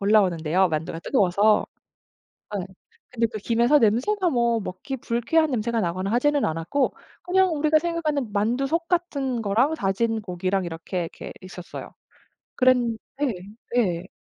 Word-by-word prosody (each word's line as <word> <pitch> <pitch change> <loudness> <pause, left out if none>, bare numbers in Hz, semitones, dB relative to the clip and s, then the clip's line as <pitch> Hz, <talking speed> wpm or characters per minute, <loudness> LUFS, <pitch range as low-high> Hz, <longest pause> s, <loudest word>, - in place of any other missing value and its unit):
올라오는데요 185 -4 +3
만두가 160 +1 -3
뜨거워서. 205 0 +3 0.9
예. 185 - -4 0.5
근데 230 -1 +2
그 220 -1 -8
김에서 235 +7 +3
냄새가 305 - +2
뭐 235 -2 +2
먹기 195 +7 -5
불쾌한 250 +7 +1
냄새가 235 -2 0
나거나 185 +3 -2
하지는 290 +4 +2
않았고 165 - -1 0.3
그냥 370 +1 +3
우리가 310 +1 +3
생각하는 305 -8 -2
만두 230 +6 +1
속 330 +3 -1
같은 280 -9 -1
거랑 230 +10 +2
다진 225 -1 0
고기랑 185 0 -1
이렇게, 170 +2 -4
이렇게 - - -8
있었어요. 185 -1 -9 0.6
그랬는 250 -3 +3 0.2
네. 285 -4 +1 0.4
예. 185 -6 +1
230 Hz, 325 characters per minute, -24 LUFS, 190-280 Hz, 0.9 s, 올라오는데요